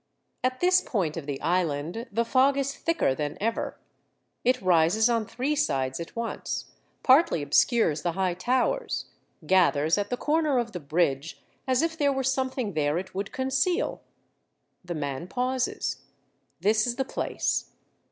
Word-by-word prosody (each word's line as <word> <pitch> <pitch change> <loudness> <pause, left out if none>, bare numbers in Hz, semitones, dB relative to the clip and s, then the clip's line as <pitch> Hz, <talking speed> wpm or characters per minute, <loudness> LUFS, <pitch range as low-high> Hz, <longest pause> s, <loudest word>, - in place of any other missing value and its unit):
At 255 0 -1
this 365 +1 +5
point 180 - -1
of 160 -4 -6
the 140 -2 -3
Island 170 - -1
the 230 +3 0
fog 270 +3 +3
is 275 0 -1
thicker 330 - +1
than 145 +1 -4
ever. 225 +2 -2 0.7
It 255 +1 +3
rises 185 +6 +3
on 225 -2 0
three 260 +6 -1
sides 135 - 0
at 170 - -7
once, 230 0 -4 0.3
partly 260 - +5
obscures 155 - +3
the 175 - -1
high 185 -1 0
towers, 255 - 0 0.4
gathers 165 -1 +3
at 205 0 -2
the 245 - -2
corner 305 -2 +1
of 235 -1 -1
the 180 - -5
bridge, 150 -1 -1 0.2
as 260 +2 +2
if 330 0 0
there 285 -3 +2
were 270 -1 -1
something 260 -4 -1
there 150 0 +1
it 185 +2 -5
would 195 +1 -4
conceal. 270 +8 0 0.8
The 175 -1 -5
man 145 +2 -4
pauses. 255 +4 -1 0.6
This 215 +4 +3
is 240 - -1
the 265 - -1
place. - - -2
220 Hz, 155 wpm, -27 LUFS, 165-260 Hz, 0.8 s, this